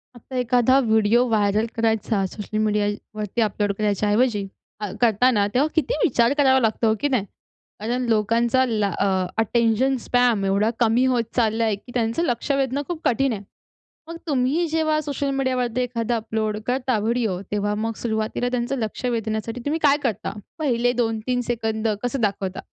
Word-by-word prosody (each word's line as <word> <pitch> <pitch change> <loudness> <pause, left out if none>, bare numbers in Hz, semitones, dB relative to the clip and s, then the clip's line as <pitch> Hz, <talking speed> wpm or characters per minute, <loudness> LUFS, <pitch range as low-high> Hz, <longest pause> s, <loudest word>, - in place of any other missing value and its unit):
आता 255 +2 -11
एखादा 250 +1 +3
video 220 0 +3
viral 210 0 +2
करायचा 220 -3 0
सोशल 210 +3 -5
मीडियावरती 210 +1 -2
अपलोड 205 -1 0
करायच्या 210 -1 0
ऐवजी, 210 -2 +2 0.3
अ, 210 -3 -4
करताना 225 -1 +3
तेव्हा 280 +5 +3
किती 330 +10 +1
विचार 240 - +3
करावा 265 -2 +5
लागतो, 225 0 +1
हो 220 - +3
की 290 - +1
नाही? 255 -8 0 0.5
कारण 240 +4 -2
लोकांचा 230 +3 +2
ला 215 -4 0
अ, - - +2 0.3
अटेंशन 235 +4 +2
स्पॅन 245 -5 +2
एवढा 200 +3 +2
कमी 235 +2 +3
होत 240 -2 +1
चालला 230 -1 +2
आहे. 220 -2 +1
की 205 +5 -15
त्यांचं 235 +6 0
लक्ष 245 -1 -1
वेधणं 275 0 0
खूप 345 -3 -5
कठीण 265 +1 +2
आहे. 200 - -5 0.7
मग 335 0 -7
तुम्ही 285 +4 +1
जेव्हा 315 -1 +1
सोशल 285 -1 -3
मीडियावरती 255 -2 0
एखादा 235 -1 -1
अपलोड 220 -1 -2
करता 255 -1 0
व्हिडिओ, 220 -3 0
तेव्हा 205 0 0
मग 225 +1 -2
सुरुवातीला 220 +2 -1
त्यांचं 250 +2 -1
लक्ष 220 +3 -4
वेधण्यासाठी 225 0 -2
तुम्ही 310 +3 0
काय 285 0 +5
करता? 220 -5 -2 0.3
पहिले 245 -5 +1
2-3 225 +2 -1
सेकंद 220 -2 -1 0.2
कसं 245 +1 -2
दाखवता? 195 -3 -1
230 Hz, 160 wpm, -23 LUFS, 215-255 Hz, 0.7 s, करावा